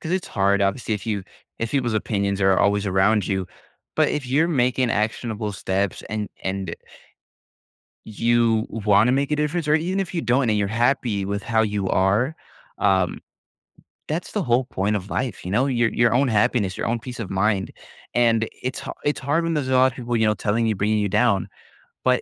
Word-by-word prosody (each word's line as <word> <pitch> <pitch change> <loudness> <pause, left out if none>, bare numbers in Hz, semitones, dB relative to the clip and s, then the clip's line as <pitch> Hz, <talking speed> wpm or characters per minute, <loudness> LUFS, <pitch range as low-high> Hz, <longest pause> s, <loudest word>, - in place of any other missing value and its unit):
'cause 165 - -4
it's 185 -1 -1
hard, 100 0 +2
obviously, 110 +3 0
if 105 +2 -7
you 105 -4 -2 0.3
if 115 0 -2
people's 125 -5 0
opinions 100 -2 -1
are 95 -1 +4
always 100 0 +2
around 100 +2 +2
you, 95 -2 -1 0.5
but - - +4
if 145 -3 -3
you're 145 +6 +2
making 130 -4 +1
actionable 110 0 -2
steps 95 0 -2
and 105 -1 -3
and 95 0 -3 1.3
you 115 0 +1
wanna 105 +2 +3
make 140 +2 0
a 150 - +1
difference, 150 +2 -1
or 150 - +4
e 160 - -2
even 190 +3 -1
if 190 - -4
you 170 - 0
don't 125 -3 +2
and 105 - +2
you're 100 - +1
happy 115 -2 +1
with 100 +1 -3
how 110 0 +1
you 105 -3 -1
are, 105 +12 +2 0.4
um, 95 -3 +2 0.9
that's 160 +4 -3
the 210 - -1
whole 125 -5 +2
point 105 -4 -1
of 100 -1 -4
life, 125 -9 -3
you 90 - -4
know, 125 +7 +2
your 120 -3 +2
your 120 -1 +3
own 135 +2 +3
happiness, 105 -3 +1
your - - -3
own 115 - 0
peace 120 +1 -8
of 110 - -5
mind. 95 0 0 0.5
And 115 -2 +3
it's 130 +1 -3
ha - - -6
it's 145 - 0
hard 145 +5 0
when 165 0 -1
there's 145 -4 -1
a - - +1
lotta 130 -1 +4
people, 120 -1 -2
you 110 - +2
know, 105 - +3
telling 105 +3 0
you, 110 - +2
bringing 105 +3 +1
you 105 -1 0
down, 105 -1 +2 0.6
but, - - +3
110 Hz, 205 wpm, -23 LUFS, 100-130 Hz, 1.3 s, are